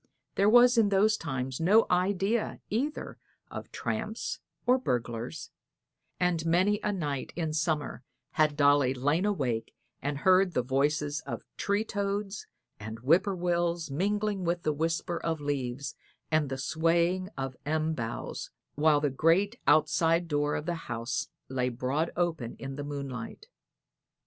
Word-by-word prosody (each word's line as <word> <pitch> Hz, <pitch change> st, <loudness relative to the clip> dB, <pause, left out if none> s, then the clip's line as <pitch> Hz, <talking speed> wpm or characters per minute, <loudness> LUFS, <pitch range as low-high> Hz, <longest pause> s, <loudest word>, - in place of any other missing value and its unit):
There 200 Hz, +1 st, +3 dB
was 245 Hz, +1 st, +7 dB
in 210 Hz, -3 st, +4 dB
those 205 Hz, +2 st, +4 dB
times 130 Hz, -6 st, -3 dB
no 205 Hz, +7 st, +5 dB
idea 195 Hz, +5 st, +1 dB
either 275 Hz, +8 st, -2 dB, 0.3 s
of -, -, -7 dB
tramps -, -, -3 dB, 0.3 s
or 255 Hz, +1 st, +4 dB
burglars, 120 Hz, -, -3 dB, 0.7 s
and 180 Hz, -3 st, +1 dB
many 185 Hz, +5 st, +3 dB
a 210 Hz, -, 0 dB
night 145 Hz, -8 st, -3 dB
in 160 Hz, -3 st, -2 dB
summer 155 Hz, -1 st, -1 dB, 0.3 s
had 155 Hz, -2 st, +2 dB
Dolly 145 Hz, -2 st, +4 dB
lain 145 Hz, +8 st, +1 dB
awake 130 Hz, -, -1 dB, 0.3 s
and 145 Hz, 0 st, -2 dB
heard 185 Hz, +3 st, +4 dB
the 125 Hz, -, +2 dB
voices 145 Hz, +3 st, 0 dB
of -, -, -4 dB
tree 200 Hz, +1 st, 0 dB
toads 200 Hz, -1 st, -3 dB, 0.3 s
and 110 Hz, +2 st, -7 dB
whip 165 Hz, +9 st, +4 dB
poor 200 Hz, -2 st, -1 dB
wills 175 Hz, -2 st, 0 dB
mingling 205 Hz, +5 st, 0 dB
with 170 Hz, 0 st, -1 dB
the 155 Hz, -, +1 dB
whisper 165 Hz, +2 st, -1 dB
of 165 Hz, -1 st, -2 dB
leaves 140 Hz, -2 st, -3 dB, 0.4 s
and 155 Hz, -3 st, +2 dB
the 135 Hz, -, -3 dB
swaying 170 Hz, +5 st, +1 dB
of 135 Hz, -1 st, -3 dB
elm 155 Hz, +2 st, 0 dB
boughs, 115 Hz, -6 st, -5 dB, 0.2 s
while 150 Hz, 0 st, +3 dB
the 145 Hz, -2 st, +1 dB
great 180 Hz, -, +2 dB
outside 165 Hz, +2 st, +3 dB
door 145 Hz, -1 st, 0 dB
of 150 Hz, -, -3 dB
the 175 Hz, -, -1 dB, 0.2 s
house 115 Hz, +2 st, -2 dB, 0.2 s
lay 125 Hz, -1 st, 0 dB
broad 130 Hz, +7 st, -1 dB
open 165 Hz, -9 st, -1 dB
in 135 Hz, 0 st, -6 dB
the 145 Hz, -, -5 dB
moonlight. 140 Hz, -5 st, -6 dB
160 Hz, 145 wpm, -29 LUFS, 140-185 Hz, 0.7 s, was